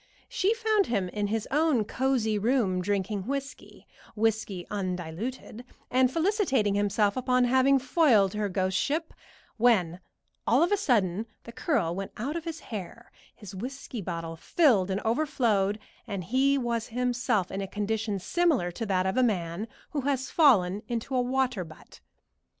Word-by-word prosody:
She 445 -3 +1
found 435 -3 +2
him 195 -6 -1
in 205 +2 -2
his 220 +1 -2
own 295 -6 +2
cosey 230 -3 0
room 210 -5 +1
drinking 200 +1 -2
whiskey 275 0 -6 0.3
whiskey 215 -4 -1
undiluted 195 +5 -4 0.3
and 255 0 +3
felicitating 325 - +1
himself 205 0 +1
upon 255 0 +2
having 260 +2 +4
foiled 255 - +3
her 210 -1 -1
ghost 185 0 -1
ship, 310 - -1 0.4
when 195 -8 +3 0.5
all 260 +7 +4
of 350 - +1
a - - +5
sudden 220 - +1 0.2
the 235 - -10
curl 230 - 0
went 195 +2 -5
out 275 +8 -3
of 335 -1 -4
his 330 -1 -5
hair, 220 +2 -8 0.2
his 205 -3 -11
whiskey 250 +3 -6
bottle 165 -2 -5
filled 205 - +2
and 195 +1 -1
overflowed, 225 -6 +1 0.3
and 195 -3 -4
he 270 +7 +2
was 235 -3 -2
himself 245 -5 0
in 195 - -3
a 195 - -4
condition 210 +1 -2
similar 270 - +1
to 225 +5 -5
that 185 -1 +1
of 190 +6 -1
a - - +5
man 195 -3 -1 0.2
who 290 - -1
has 270 -1 -1
fallen 205 - +4
into 240 +2 -3
a 250 - +3
water 255 -4 0
butt. 160 -2 -15
225 Hz, 155 wpm, -28 LUFS, 195-265 Hz, 0.5 s, a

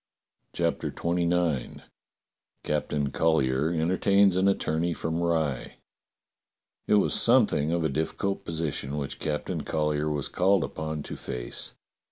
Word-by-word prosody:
CHAPTER - - 0
XXIX 85 -4 -1 0.8
CAPTAIN 75 -2 -1
COLLYER 75 -3 +2
ENTERTAINS 95 +4 +3
AN 95 +1 +3
ATTORNEY 85 -3 0
FROM 80 +1 -2
RYE 80 -6 -1 1.1
IT - - +4
WAS 105 - +3
something 110 - +3
of 85 -1 0
a - - +3
difficult 80 +7 -2
position 75 -3 -3
which 70 -2 -4
Cap 75 -1 -2
tain - - -3
Collyer 75 -1 0
was 75 -2 -2
called 95 -1 +2
upon 80 -1 -4
to - - -6
face. - - -5
80 Hz, 125 wpm, -27 LUFS, 75-90 Hz, 1.1 s, IT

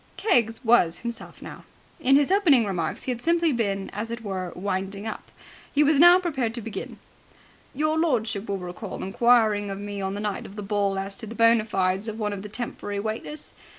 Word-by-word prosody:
Keggs 235 - +1
was 180 -8 +4
himself 235 -1 -6
now. - - -9 0.4
In 270 -3 +4
his 285 +4 +3
opening 320 - +5
remarks 175 -5 -3
he 260 - -2
had 240 -1 -4
simply 335 0 +2
been, 200 -5 -1
as 210 +3 -4
it 235 0 -6
were, 185 -3 -4
winding 195 +2 -3
up. 220 - -6 0.4
He 290 - +3
was 295 -1 +3
now 350 +2 +9
prepared 265 -11 -2
to 240 - -5
begin. 225 0 -6 0.8
"Your 310 +3 +1
lordship 225 -10 0
will 200 - -1
recall 180 +3 -7
inquiring 215 0 +3
of 195 - -4
me 205 0 -5
on 190 0 -2
the - - -4
night 210 -2 -3
of 195 - -13
the 210 - -6
ball 200 -1 0
as 195 +1 -4
to 225 - -7
the 225 - -8
bona 230 -1 +4
fides 190 0 0
of 220 0 -4
one 210 -2 -2
of 195 - -5
the 210 - -8
temporary 205 -3 -5
waiters? 220 +8 -5
220 Hz, 205 wpm, -25 LUFS, 200-245 Hz, 0.8 s, now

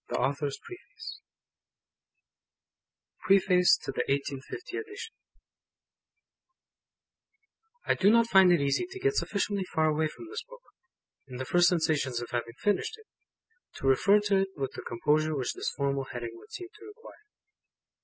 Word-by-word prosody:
A - - -3
Last 140 +2 0
Retrospect 150 - -5 2.4
PREFACE 185 -2 +4
TO - - -6
1850 140 - -3
EDITION 435 +1 -7 2.7
I - - +3
do 200 - +3
not 230 +1 +5
find 190 -4 +6
it 175 - +4
easy 140 - 0
to 385 0 -8
get 415 +2 +1
sufficiently 200 - -1
far 160 -3 0
away 155 +1 +1
from 250 - -11
this 440 +6 -5
Book, - - -14 0.6
in 125 -2 -8
the 130 - -4
first 175 +5 +4
sensations 155 -7 0
of 120 - -7
having 120 -1 -3
finished 205 - 0
it, 445 - -18 0.7
to - - -7
refer 195 +10 +5
to 205 -1 +2
it 195 0 +2
with 135 -2 -3
the - - -8
composure 155 +6 0
which 130 -3 -2
this - - -3
formal 140 -1 -1
heading 120 -2 -6
would 115 - -16
seem 360 -1 -7
to 420 - -13
require. 425 +2 -14
175 Hz, 145 wpm, -29 LUFS, 140-235 Hz, 2.7 s, find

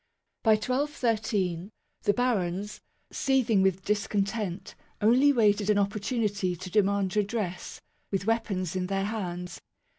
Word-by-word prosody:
By 220 - +5
1213, 215 - 0 0.3
the 205 - +2
barons, 205 -5 -1 0.3
seething 250 -7 +2
with 190 -1 +1
discontent, 205 -2 -1 0.3
only 250 +7 +5
waited 210 -5 +3
an 210 - +4
opportunity 205 -2 0
to 185 +2 -8
demand 200 -1 +2
redress, 205 -3 -2 0.3
with 195 -1 -2
weapons 200 -6 -1
in 180 -1 -1
their 195 0 -1
hands. 180 -5 -4
205 Hz, 115 wpm, -28 LUFS, 190-225 Hz, 0.3 s, By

